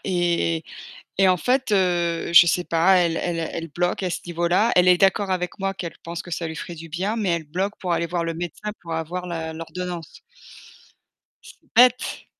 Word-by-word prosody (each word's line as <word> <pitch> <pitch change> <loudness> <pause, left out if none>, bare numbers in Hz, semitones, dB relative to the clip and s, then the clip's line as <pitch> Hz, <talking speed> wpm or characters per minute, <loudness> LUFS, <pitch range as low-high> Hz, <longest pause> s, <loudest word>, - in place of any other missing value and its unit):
et 175 -3 0 0.5
et 195 - +5
en 185 - +5
fait, 255 +2 0
heu, 175 -3 +1
je 170 0 +9
sais 180 +1 +1
pas, 170 +3 +3
elle 170 -2 +2
elle 170 -2 -2
elle 165 0 -4
bloque 175 +2 0
à 180 - 0
ce - - -3
niveau-là. 175 +5 +1
Elle 180 0 +5
est 180 - +6
d'accord 195 +1 +2
avec 180 +2 -2
moi, 195 0 -1
qu'elle 175 -3 -6
pense 170 0 -5
que 175 - -12
ça 165 0 -3
lui 160 - -6
ferait 170 +2 -7
du 165 +1 -9
bien, 190 +7 -2
mais 205 -4 -1
elle 170 -2 0
bloque 190 +7 -2
pour 180 -3 -3
aller 170 - 0
voir 175 -1 -2
le 165 - -2
médecin, 175 +5 -5
pour 165 -1 -6
avoir 175 +3 -4
la 160 -2 -4
l'ordonnance. 170 0 -7 1.2
c'est - - -13 0.2
bête! 250 +1 +4
175 Hz, 205 wpm, -23 LUFS, 170-185 Hz, 1.2 s, je